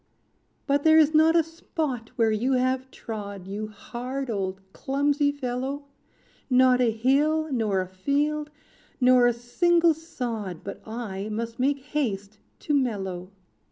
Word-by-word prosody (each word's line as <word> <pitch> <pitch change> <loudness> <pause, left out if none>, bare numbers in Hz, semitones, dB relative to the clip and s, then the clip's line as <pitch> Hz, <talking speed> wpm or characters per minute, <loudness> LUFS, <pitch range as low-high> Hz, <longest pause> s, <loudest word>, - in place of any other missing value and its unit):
"But 280 0 +2
there 315 0 +6
is 315 0 +5
not 315 +2 +5
a 335 - +5
spot 310 -7 -4
where 225 -2 +3
you 240 +5 +1
have 255 +1 0
trod. 200 -6 -7
You 205 +3 -4
hard, 250 +4 -5
old 190 -2 -2
clumsy 285 +1 +1
fellow, 275 +1 -4 0.6
Not 255 -1 +5
a 240 - +4
hill, 285 +8 +2
nor 215 -7 +1
a 185 - -5
field, 290 +10 -1 0.5
nor 250 -1 +6
a - - +4
single 335 +8 +3
sod, 235 - -5
But 200 - -7
I 215 -3 -5
must 230 +2 -4
make 275 +2 +1
haste 215 -8 -3 0.2
to 300 - -1
mellow. 195 -9 -1
255 Hz, 140 wpm, -26 LUFS, 215-285 Hz, 0.6 s, there